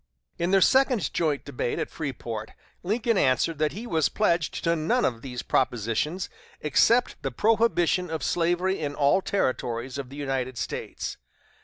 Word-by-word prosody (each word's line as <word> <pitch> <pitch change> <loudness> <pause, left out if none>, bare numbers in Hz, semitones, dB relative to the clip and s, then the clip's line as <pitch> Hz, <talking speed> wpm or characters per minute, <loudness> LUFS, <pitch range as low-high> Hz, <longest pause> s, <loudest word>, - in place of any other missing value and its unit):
In 170 - 0
their 195 0 +4
second 260 -3 +3
joint 155 -4 0
debate 125 -3 -2
at 160 - -3
Freeport, 115 -7 -5 0.3
Lincoln 220 +3 +1
answered 140 +4 +2
that 155 -1 +1
he 220 +5 -6
was 160 -9 +1
pledged 170 -7 0
to 170 -1 +2
none 225 +11 +1
of 115 -2 -1
these 125 -1 -6
propositions, 125 - 0 0.3
except 230 - +3
the - - -1
prohibition 210 -5 +2
of 160 -1 -3
slavery 175 +3 +1
in 145 -2 -3
all 145 +6 +3
Territories 130 - -1
of 135 -2 -6
the 135 - -10
United 130 -3 -2
States. - - -4
160 Hz, 155 wpm, -26 LUFS, 130-190 Hz, 0.3 s, their